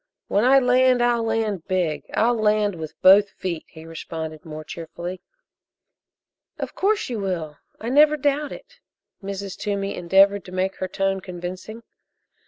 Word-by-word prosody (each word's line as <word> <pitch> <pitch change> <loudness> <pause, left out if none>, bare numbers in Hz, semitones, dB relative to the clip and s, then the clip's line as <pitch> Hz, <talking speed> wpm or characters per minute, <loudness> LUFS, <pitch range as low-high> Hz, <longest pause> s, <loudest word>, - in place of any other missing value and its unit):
"When 205 - +2
I 265 +2 +6
land, 255 0 +4
I'll 240 -1 +2
land 220 -6 -1
big 180 -5 -1
I'll 235 +2 +3
land 210 -2 +2
with 160 -3 -8
both 200 +2 +7
feet," 175 -5 -5
he 160 0 -13
responded 160 -1 -7
more 155 -1 -7
cheerfully. 170 +3 -7 1.4
"Of - - -5
course, 415 +2 +1
you 235 -3 -3
will 170 -6 -3 0.2
I 225 - -4
never 300 +3 +5
doubt 285 +1 0
it." - - -12 0.4
Mrs. 195 -1 -5
Toomey 200 -1 -3
endeavored 195 +3 +3
to 180 - -10
make 185 +1 -1
her 185 - -3
tone 195 +1 -1
convincing. 185 +5 -7
195 Hz, 150 wpm, -23 LUFS, 175-230 Hz, 1.4 s, both